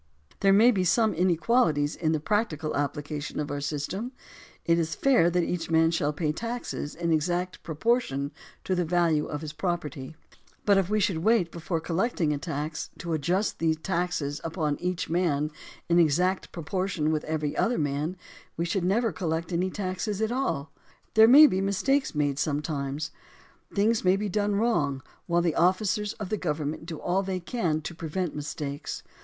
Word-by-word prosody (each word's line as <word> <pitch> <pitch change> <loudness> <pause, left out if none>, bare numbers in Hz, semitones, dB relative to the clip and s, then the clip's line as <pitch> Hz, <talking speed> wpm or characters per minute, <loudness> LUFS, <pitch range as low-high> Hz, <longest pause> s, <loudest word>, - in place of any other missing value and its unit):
There 195 - +4
may 220 +5 +7
be 190 -5 +1
some 220 +5 +3
inequalities 170 -3 +2
in 160 -2 0
the 155 - +1
practical 160 -4 -1
application 145 +1 -3
of 150 -1 -3
our 145 0 -3
system. 155 - -3 0.5
It 170 0 +3
is 160 -1 -1
fair 250 - +4
that 175 0 +1
each 165 -1 -3
man 165 0 +4
shall 150 -3 +1
pay 150 0 -1
taxes 230 -5 -4
in 170 0 -1
exact 175 +3 -1
proportion 155 - 0 0.3
to 190 - -1
the 180 -1 +1
value 165 -3 +2
of 150 - -4
his 155 -1 -6
property; 160 -6 -3 0.5
but 200 -2 +5
if 190 -1 -1
we 215 0 +2
should 185 -5 +1
wait, 185 -2 +2
before 170 0 -3
collecting 170 -1 0
a 145 - -3
tax, 155 -1 -4
to 170 -1 -4
adjust 175 +7 0
the 160 -1 +2
taxes 165 -4 -2
upon 155 -3 -2
each 180 0 -2
man 160 -3 0 0.4
in 170 0 +4
exact 180 +4 +2
proportion 170 -1 -1
with 155 -1 0
every 155 -2 -2
other 240 +1 +1
man, 150 +4 -1 0.4
we 170 - 0
should 175 +1 -1
never 220 +6 +2
col 185 - -4
lect 160 +2 -2
any 180 +2 +1
tax 185 +1 -3
at 215 +2 -1
all. 240 - -2 0.4
There 220 0 +8
may 285 +6 +10
be 190 -10 +2
mistakes 235 - +1
made 145 -2 0
sometimes; 145 0 -2 0.6
things 215 +3 +2
may 185 0 +4
be 205 +1 -2
done 205 +1 0
wrong, 145 - +1 0.2
while 175 0 +2
the 170 -2 +1
officers 205 +5 +1
of 205 -4 -6
the 215 - 0
government 155 -2 -3
do 160 - -5
all 185 +2 +1
they 190 -1 -3
can 170 -5 -1
to 165 - -6
prevent 165 +1 -3
mistakes. 145 -1 -5
170 Hz, 175 wpm, -27 LUFS, 150-195 Hz, 0.6 s, may